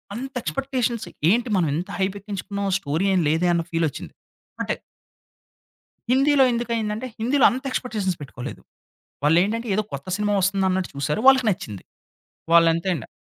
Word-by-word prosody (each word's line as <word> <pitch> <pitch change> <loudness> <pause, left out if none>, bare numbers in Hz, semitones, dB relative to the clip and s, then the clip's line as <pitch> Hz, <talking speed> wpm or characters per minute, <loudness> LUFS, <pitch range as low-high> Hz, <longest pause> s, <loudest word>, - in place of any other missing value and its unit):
అంత 265 +3 -6
ఎక్స్‌పెక్టేషన్స్ 255 -4 -2 0.2
ఏంటి 235 +4 +2
మనం 170 - +2
ఎంత 175 +5 -4
హైప్ 190 +1 0
ఎక్కించుకున్నాం 200 0 -4
స్టోరీ 160 +3 -1
ఏమి 180 -3 +2
లేదే 165 +3 +2
అని 170 -1 0
ఫీల్ 165 0 +1
వచ్చింది. 140 - -9 0.5
అంటే - - -1 1.4
హిందీలో 275 +1 +5
ఎందుకు 235 0 -2
అయింది 215 -2 -1
అంటే 250 +4 -5
హిందీలో 250 +4 +2
అంత 260 +2 -5
ఎక్స్‌పెక్టేషన్స్ 210 -9 -2
పెట్టుకోలేదు. 130 -3 -8 0.6
వాళ్ళు 155 +3 +4
ఏంటంటే 230 +4 -2
ఏదో 215 - +1
కొత్త 140 +5 -6
సినిమా 210 0 0
వస్తుందన్నట్టు 190 -1 +1
చూసారు 150 +8 -1
వాళ్ళకి 265 -3 +6
నచ్చింది. 105 - -6 0.7
వాళ్ళంతే 165 +2 +4
అండి. 125 - -7
200 Hz, 150 wpm, -23 LUFS, 170-235 Hz, 1.4 s, వాళ్ళకి